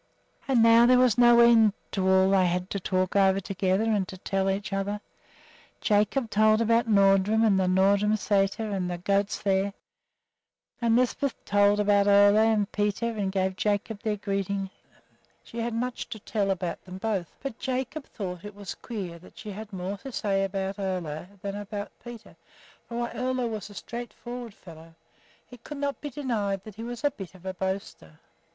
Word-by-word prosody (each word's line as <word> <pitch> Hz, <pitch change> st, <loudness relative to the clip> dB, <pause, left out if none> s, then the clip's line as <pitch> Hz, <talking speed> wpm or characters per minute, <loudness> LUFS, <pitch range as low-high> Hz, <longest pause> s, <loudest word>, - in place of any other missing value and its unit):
And 250 Hz, -4 st, +4 dB
now 230 Hz, +1 st, +7 dB
there 250 Hz, 0 st, +6 dB
was 250 Hz, -4 st, +4 dB
no 240 Hz, 0 st, +6 dB
end 225 Hz, -3 st, +6 dB, 0.2 s
to 190 Hz, -1 st, 0 dB
all 190 Hz, 0 st, +4 dB
they 190 Hz, -2 st, +4 dB
had 180 Hz, +1 st, -2 dB
to 200 Hz, -, -2 dB
talk 185 Hz, 0 st, -1 dB
over 195 Hz, -1 st, +4 dB
together 190 Hz, +1 st, 0 dB
and 210 Hz, -4 st, +1 dB
to 190 Hz, -, -9 dB
tell 195 Hz, +1 st, -1 dB
each 195 Hz, +1 st, -2 dB
other. 200 Hz, +1 st, -2 dB, 0.8 s
Jacob 215 Hz, +3 st, +1 dB
told 215 Hz, +1 st, +4 dB
about 230 Hz, +1 st, +2 dB
Nordrum 200 Hz, +1 st, +4 dB
and 200 Hz, -3 st, +3 dB
the 185 Hz, -, +1 dB
Nordrum 200 Hz, +3 st, +3 dB
Sæter 205 Hz, +1 st, 0 dB
and 185 Hz, -2 st, -2 dB
the 175 Hz, -, -3 dB
goats 200 Hz, +3 st, 0 dB
there; 195 Hz, 0 st, +1 dB, 1.1 s
and 230 Hz, -1 st, +3 dB
Lisbeth 255 Hz, +2 st, 0 dB
told 205 Hz, 0 st, +3 dB
about 205 Hz, -1 st, +3 dB
Ole 205 Hz, 0 st, +6 dB
and 215 Hz, -2 st, +3 dB
Peter, 210 Hz, +3 st, -1 dB
and 205 Hz, -4 st, -2 dB
gave 190 Hz, -1 st, 0 dB
Jacob 205 Hz, +1 st, -1 dB
their 215 Hz, -3 st, -1 dB
greetings. 195 Hz, -1 st, -2 dB, 0.7 s
She 235 Hz, -, -8 dB
had 230 Hz, 0 st, -2 dB
much 250 Hz, +1 st, -3 dB
to -, -, -6 dB
tell 205 Hz, -1 st, -2 dB
about 180 Hz, -2 st, -2 dB
them 185 Hz, 0 st, -9 dB
both, 195 Hz, -4 st, -2 dB
but 270 Hz, -4 st, -5 dB
Jacob 265 Hz, +3 st, -3 dB
thought 180 Hz, -3 st, -6 dB
it 205 Hz, -1 st, -9 dB
was 205 Hz, -1 st, -6 dB
queer 190 Hz, -8 st, -7 dB
that 180 Hz, -, -17 dB
she 215 Hz, -, -7 dB
had 215 Hz, +2 st, -8 dB
more 190 Hz, +1 st, -4 dB
to 270 Hz, -, -8 dB
say 195 Hz, -4 st, 0 dB
about 195 Hz, 0 st, -3 dB
Ole 180 Hz, -5 st, -3 dB, 0.2 s
than 200 Hz, 0 st, -3 dB
about 205 Hz, 0 st, -6 dB
Peter; 240 Hz, -2 st, -11 dB, 0.5 s
for 235 Hz, -, -5 dB
while 240 Hz, 0 st, -2 dB
Ole 255 Hz, -1 st, -1 dB
was 215 Hz, -3 st, -5 dB
a 205 Hz, -, -13 dB
straight 240 Hz, +3 st, -7 dB
forward 240 Hz, -3 st, -8 dB
fellow, 165 Hz, -1 st, -14 dB, 0.6 s
it 245 Hz, -2 st, -13 dB
could 295 Hz, -, -7 dB
not 280 Hz, 0 st, -3 dB
be 295 Hz, -, -4 dB
denied 220 Hz, -8 st, -2 dB
that 215 Hz, -, -10 dB
he 225 Hz, -, -8 dB
was 240 Hz, +1 st, -6 dB
a 290 Hz, -, +3 dB
bit 195 Hz, -5 st, -10 dB
of 185 Hz, 0 st, -16 dB
a 190 Hz, -, -3 dB
boaster. 190 Hz, -, -5 dB
205 Hz, 185 wpm, -27 LUFS, 190-230 Hz, 1.1 s, now